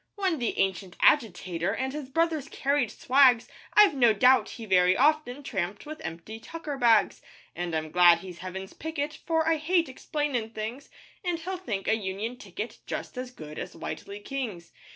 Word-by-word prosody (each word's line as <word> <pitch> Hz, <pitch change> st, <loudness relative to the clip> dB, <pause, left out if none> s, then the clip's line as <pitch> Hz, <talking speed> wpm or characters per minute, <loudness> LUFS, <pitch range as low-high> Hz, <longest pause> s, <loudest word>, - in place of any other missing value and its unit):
When 380 Hz, -6 st, 0 dB
the 235 Hz, -, -2 dB
ancient 190 Hz, -1 st, -1 dB
agitator 185 Hz, -, +2 dB
And 265 Hz, +2 st, -2 dB
his 290 Hz, -3 st, -6 dB
brothers 320 Hz, -1 st, 0 dB
carried 280 Hz, -4 st, 0 dB
swags, 255 Hz, -2 st, +4 dB, 0.3 s
I've 420 Hz, -5 st, +7 dB
no 240 Hz, -5 st, +5 dB
doubt 250 Hz, +5 st, +4 dB
he 230 Hz, -, -8 dB
very 185 Hz, -2 st, +4 dB
often 290 Hz, -1 st, +2 dB
Tramped 195 Hz, -4 st, -3 dB
with 310 Hz, +1 st, -8 dB
empty 170 Hz, +7 st, -7 dB
tucker 310 Hz, +3 st, -6 dB
bags; 235 Hz, -5 st, +3 dB, 0.3 s
And 175 Hz, -1 st, -3 dB
I'm 155 Hz, -1 st, -3 dB
glad 175 Hz, -1 st, +7 dB
he's 180 Hz, -2 st, -9 dB
Heaven's 190 Hz, +1 st, -7 dB
picket, 305 Hz, -1 st, -4 dB
For 320 Hz, 0 st, -1 dB
I 325 Hz, 0 st, +3 dB
hate 335 Hz, +2 st, +1 dB
explainin' 260 Hz, -4 st, -3 dB
things, 225 Hz, +6 st, -5 dB, 0.3 s
And 355 Hz, -2 st, -1 dB
he'll 365 Hz, +3 st, -4 dB
think 215 Hz, -, -4 dB
a -, -, +4 dB
union 215 Hz, +3 st, -4 dB
ticket 210 Hz, +1 st, -7 dB
Just -, -, -5 dB
as 255 Hz, 0 st, -5 dB
good 155 Hz, -10 st, -9 dB
as -, -, -7 dB
Whitely 200 Hz, +1 st, -6 dB
King's. 210 Hz, -8 st, -5 dB
245 Hz, 170 wpm, -27 LUFS, 190-295 Hz, 0.3 s, I've